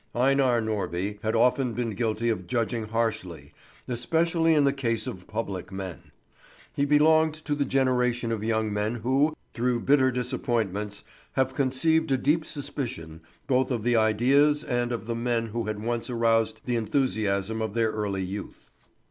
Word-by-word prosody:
Einar 130 -2 +3
Norby 105 -2 -2
had 110 +1 -1
often 125 +1 +2
been 120 -1 -2
guilty 115 +1 -1
of 90 -6 -2
judging 115 +1 -1
harshly, 95 -10 -3 0.3
especially 165 +6 +1
in 150 - +4
the 140 -1 +3
case 115 -5 -1
of 90 -1 -7
public 100 -6 -4
men. 95 -3 -7 0.6
He 140 - +1
belonged 155 +2 +4
to 150 - 0
the 145 -1 0
generation 125 -3 +1
of 110 -2 -2
young 110 -1 0
men 105 +3 -1
who, 135 +7 +1 0.2
through 120 0 0
bitter 135 0 +4
disappointments, 115 -5 -2 0.3
have 130 0 +1
conceived 140 +4 +1
a 135 - +3
deep 155 +5 +1
suspicion 120 - -5 0.2
both 130 -1 +2
of 120 -5 -2
the 120 0 +2
ideas 130 +7 +3
and 120 -3 -1
of 120 -2 -3
the 115 - -2
men 115 0 0
who 115 +1 -3
had 105 0 -4
once 120 +2 -2
aroused 115 -2 +1
the 125 -2 0
enthusiasm 110 -3 0
of 110 -1 -3
their 115 -2 +2
early 100 -3 -2
youth. 95 +2 -7
120 Hz, 160 wpm, -26 LUFS, 110-130 Hz, 0.6 s, in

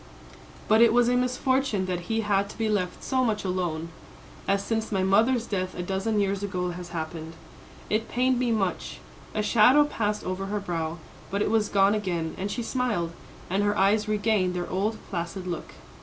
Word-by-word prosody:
But 220 +1 +5
it 230 -1 +6
was 240 0 +4
a 250 - +2
misfortune 250 -4 +1
that 180 -1 -4
he 225 0 +1
had 200 -1 +1
to - - -11
be 225 -1 0
left 185 -4 -1
so 260 -1 +1
much 215 -4 0
alone, 175 -3 -2 0.6
as 195 0 +2
since 220 +1 -2
my 190 -2 +1
mother's 225 +5 +3
death 185 -4 -3
a 180 - -3
dozen 195 +4 0
years 200 -1 0
ago 180 -3 -2
has 175 0 -7
happened. 160 -1 -5 0.5
It 220 +1 -1
pained 255 0 +2
me 250 -2 +1
much." 195 -5 -1 0.4
A 215 - +1
shadow 240 +7 +6
passed 210 -7 -2
over 185 +1 -3
her 210 +1 -1
brow, 165 -4 -3 0.3
but 200 +1 0
it - - 0
was 220 -2 +2
gone 195 0 +4
again, 175 -6 -2
and 195 +2 -2
she 240 +3 -3
smiled, 230 -9 -1 0.4
and 190 +3 0
her 205 0 +1
eyes 210 +3 +3
regained 210 -3 +1
their 175 -1 -2
old 205 +5 -1
placid 180 +1 -4
look. 175 -2 -5
200 Hz, 190 wpm, -26 LUFS, 185-225 Hz, 0.6 s, it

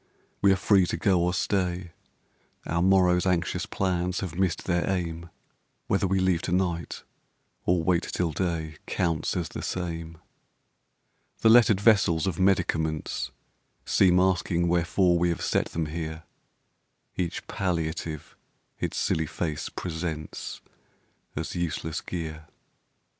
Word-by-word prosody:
We 100 - +6
are - - +5
free 95 -1 +3
to - - -2
go 95 -5 +3
or 90 +1 +2
stay; 90 -1 -1 0.7
Our 85 +1 0
morrowŌĆÖs 90 -1 +4
anxious 90 -2 0
plans 90 -1 -1
have 95 -5 -4
missed 90 -1 0
their 90 0 0
aim; 85 -3 -2 0.6
Whether 95 - +1
we 95 +1 +1
leave 95 -2 +2
to 90 - -3
night 90 -2 -1 0.6
or 85 -1 +3
wait 85 0 +3
till 90 -2 -2
day 80 -2 -2
Counts 85 -1 0
as 85 -4 -2
the - - -6
same. 85 -2 -4 1.2
The 110 - +5
lettered 110 -4 +6
vessels 100 -6 +4
of 95 -3 -2
medicaments 80 -5 +1 0.6
Seem 90 -1 +4
asking 90 -2 +2
wherefore 85 +1 +2
we 90 +1 +2
have 85 - -2
set - - +1
them 80 -1 -2
here; 80 0 -5 0.9
Each 85 -2 -3
palliative 80 -4 -3 0.4
its - - -2
silly 80 -1 0
face 75 -1 -3
presents 80 -3 -5 0.7
As 80 +2 -3
useless 80 -2 -2
gear. 80 -3 -6
85 Hz, 130 wpm, -27 LUFS, 80-95 Hz, 1.2 s, We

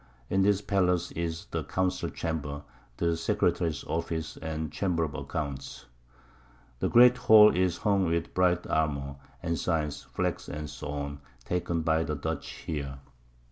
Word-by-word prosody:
In 95 - +3
this 100 0 +3
Pallace 90 -3 +1
is 85 0 -3
the - - -2
Council 95 0 -1
Chamber, 75 -3 -4 0.3
the 85 -1 +1
Secretary's 80 -2 0
Office 80 -1 -3
and 80 -1 -4
Chamber 90 -4 0
of 75 -3 -3
Accounts. 70 -3 -5 0.9
The - - +1
great 125 +1 +7
Hall 110 -3 +7
is 90 -1 +1
hung 100 -3 +2
with 85 +1 -1
bright 90 -1 +2
Armour, 70 -3 -1 0.3
Ensigns, 80 -3 -1
Flags, - - -2 0.3
&c. 70 0 -5 0.3
taken 85 -2 -1
by 80 0 +2
the 75 -2 -2
Dutch 70 - -3 0.2
here. 70 -3 -4
80 Hz, 135 wpm, -29 LUFS, 75-90 Hz, 0.9 s, great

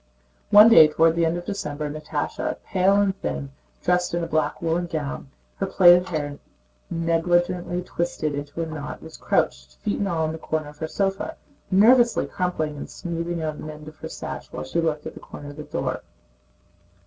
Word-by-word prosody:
One 210 +2 +9
day 165 -9 +9
toward 165 +2 +3
the 170 -1 +2
end 165 +2 0
of 175 - -6
December 150 -7 -3
Natásha, 150 0 -3
pale 190 +1 +3
and 200 -1 +2
thin, 140 -1 -3 0.3
dressed 180 -1 +1
in 170 - -1
a - - -2
black 155 -1 0
woolen 170 +1 0
gown, 70 - -4 0.3
her - - -1
plaited 180 0 +6
hair 145 -4 -3 0.5
negligently 175 +1 0
twisted 170 -4 -2
into 145 +3 -4
a - - -2
knot, 155 -2 -7
was 160 0 -10
crouched - - -1
feet 210 - -1
and 200 - 0
all 165 -4 0
in 155 - -1
the 160 - -6
corner 155 -1 -3
of 150 0 -16
her 160 - -2
sofa, 195 +3 -2 0.3
nervously 235 +5 +5
crumpling 160 -5 -2
and - - -7
smoothing 170 -1 -4
out 155 -1 -3
the 155 - -6
end 150 0 -11
of 155 0 -11
her - - -7
sash - - -7
while 75 - -5
she 170 - -1
looked 155 -2 -1
at - - -7
a - - -7
corner 145 0 -10
of 145 - -14
the 150 - -6
door. - - -3
165 Hz, 195 wpm, -24 LUFS, 155-180 Hz, 0.5 s, One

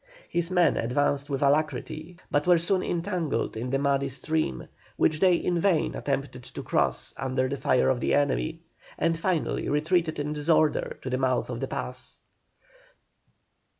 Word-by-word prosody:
His 170 0 0
men 180 -4 +3
advanced 140 +4 0
with 140 0 -1
alacrity, 155 +3 0
but 145 +3 +1
were 175 -1 +6
soon 185 +3 +1
entangled 170 - -2
in 120 +3 -3
the 135 - +1
muddy 140 0 +1
stream, 135 - -2 0.3
which 155 -1 +2
they 185 -1 +5
in 175 0 0
vain 175 -3 +2
attempted 135 -2 -3
to - - -8
cross - - 0
under 130 0 0
the 140 - -2
fire 130 -2 +2
of 130 -2 +2
the - - +1
enemy, 155 +3 0 0.4
and 165 0 +1
finally 165 0 -1
retreated 160 +2 +1
in 145 +1 -2
disorder 155 +1 +1
to 130 - -3
the 130 - 0
mouth 130 -1 0
of 120 - -4
the 135 - -2
pass. 125 -2 -6
145 Hz, 160 wpm, -27 LUFS, 135-165 Hz, 0.4 s, were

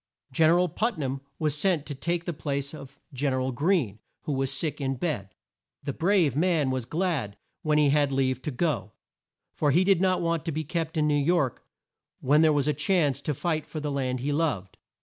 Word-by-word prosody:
Gen 155 +4 +4
er 170 - +5
al 180 0 +3
Put 220 +7 -1
nam 135 -2 -3 0.2
was 155 -3 0
sent 160 -1 +1
to 150 - -5
take 170 +5 -2
the 175 - -2
place 140 -2 -3
of 140 -2 -11
Gen 135 +1 0
er 130 - 0
al 130 +1 -1
Greene 135 - 0 0.2
who 150 - -2
was 135 0 0
sick 150 +2 -2
in 135 -1 -1
bed. 125 - -3 0.5
The 140 - -3
brave 170 - +2
man 160 -4 +2
was 130 -2 -2
glad 155 - -1 0.2
when 150 -1 +2
he 150 -2 +4
had 145 -1 +2
leave 130 -1 0
to 150 - -3
go, 140 - -1 0.6
for 150 - +1
he 170 +7 +4
did 190 -2 +3
not 185 -1 +3
want 170 -2 0
to 165 - -1
be 155 +1 -2
kept 160 +1 -3
in 150 -1 +2
New 150 - +2
York 145 -2 +1 0.6
when 145 +4 +4
there 160 -1 +5
was 145 -1 +1
a 150 - +3
chance 145 -2 +1
to 150 0 -2
fight 160 +1 -2
for 155 - -5
the 150 -1 -3
land 130 -2 -1
he 145 +3 -1
loved. 145 - -1
150 Hz, 220 wpm, -27 LUFS, 135-165 Hz, 0.6 s, er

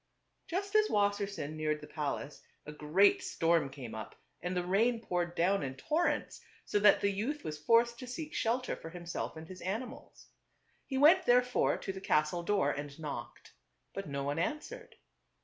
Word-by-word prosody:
Just 395 +3 -3
as 430 0 +5
Wassersein 200 -6 0
neared 155 -1 -1
the - - -10
palace 150 -1 -4 0.2
a 150 - -7
great 150 +7 +3
storm 165 -3 +1
came 130 -5 -8
up 110 0 -7 0.3
and 180 +1 -2
the 175 - -1
rain 225 +6 +2
poured 175 -5 -2
down 190 +4 +2
in 135 -2 -4
tor 315 - 0
rents, - - -2 0.2
so 205 - +1
that 205 0 +6
the 200 - +2
youth 250 +10 -3
was 150 -1 -5
forced 235 +4 +4
to 255 - -7
seek 300 +5 -6
shelter 250 +2 0
for 165 - -9
himself 175 -1 -5
and 160 0 -9
his 185 +1 -10
animals. 235 +8 -6 0.6
He 265 - -2
went 295 +5 +6
therefore 250 0 +3
to 195 - -5
the 190 - -8
castle 155 0 +1
door 200 +2 +1
and 145 0 -6
knocked; 150 -3 -7 0.4
but 195 -4 -5
no 140 0 -3
one 145 +3 -1
an 295 - 0
swered. - - -11
195 Hz, 185 wpm, -32 LUFS, 155-240 Hz, 0.6 s, that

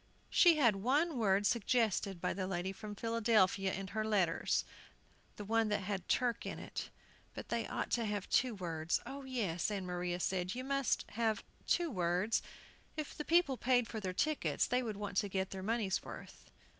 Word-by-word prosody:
She 345 -2 +7
had 235 -9 +4
one 275 - +1
word 200 -2 +3
suggested 215 -4 +1
by - - -1
the 185 0 -3
lady 185 0 -2
from 205 +2 -8
Philadelphia 215 -4 +2
in 195 +1 -4
her 215 +1 -1
letters, 195 -6 +1 0.7
the 205 - -7
one 225 +1 +2
that 210 -1 0
had 190 -1 -4
"Turk" 245 -2 +1
in - - -5
it, - - -6 0.5
but - - -7
they 230 -2 -1
ought - - -3
to 235 -2 +1
have 205 -2 -2
two 250 -3 +2
words 165 -3 -1
"Oh, 275 0 -7
yes," 215 -11 -1
Ann 200 -3 -3
Maria 180 0 -2
said, 180 +1 -1
"you 255 - -4
must 275 -1 0
have 220 0 0 0.2
two 345 -3 +2
words; 180 +2 +1 0.6
if 305 -2 -4
the 300 - -4
people 325 -5 +3
paid 245 -1 +2
for 220 - -5
their 190 -3 -3
tickets 305 +11 +1
they 250 +1 +1
would 220 -5 -4
want 205 -2 -4
to 205 - +2
get 190 0 -2
their 190 - -5
money's 210 -1 0
worth." - - -10
210 Hz, 185 wpm, -35 LUFS, 190-240 Hz, 0.7 s, She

